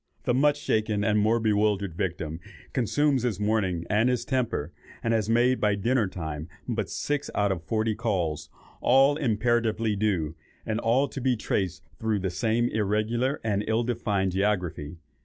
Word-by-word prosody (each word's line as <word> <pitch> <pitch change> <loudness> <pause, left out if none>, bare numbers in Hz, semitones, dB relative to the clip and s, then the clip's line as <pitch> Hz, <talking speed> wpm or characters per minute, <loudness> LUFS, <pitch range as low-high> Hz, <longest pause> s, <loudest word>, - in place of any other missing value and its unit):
The 125 - +1
much 145 +3 +3
shaken 110 -5 0
and 105 0 +2
more 110 +3 +3
bewildered 105 -4 +1
victim 85 -3 -3 0.3
consumes 140 +2 +2
his 115 -5 -1
morning 100 -5 0
and 110 +4 +2
his 120 -2 0
temper, 125 - -1 0.3
and 115 - +1
has 110 -1 0
made 120 +3 +3
by 105 -1 +3
dinner 115 +2 +1
time 80 -3 -6 0.2
but - - -2
six 145 -1 -2
out 100 -1 +2
of 90 -3 -2
forty 110 +5 0
calls, 85 -9 -2 0.3
all 135 +3 +5
imperatively 115 -4 +1
due, 95 -7 0 0.3
and 110 0 -1
all 125 +5 +2
to 135 - -7
be 130 0 +2
traced 95 -4 -2 0.2
through 110 -2 0
the 95 -2 -2
same 115 +4 +1
irregular 110 +6 0
and 105 -2 0
ill 110 +2 +1
defined 100 -5 0
geography. 90 -5 -1
110 Hz, 160 wpm, -27 LUFS, 95-120 Hz, 0.3 s, all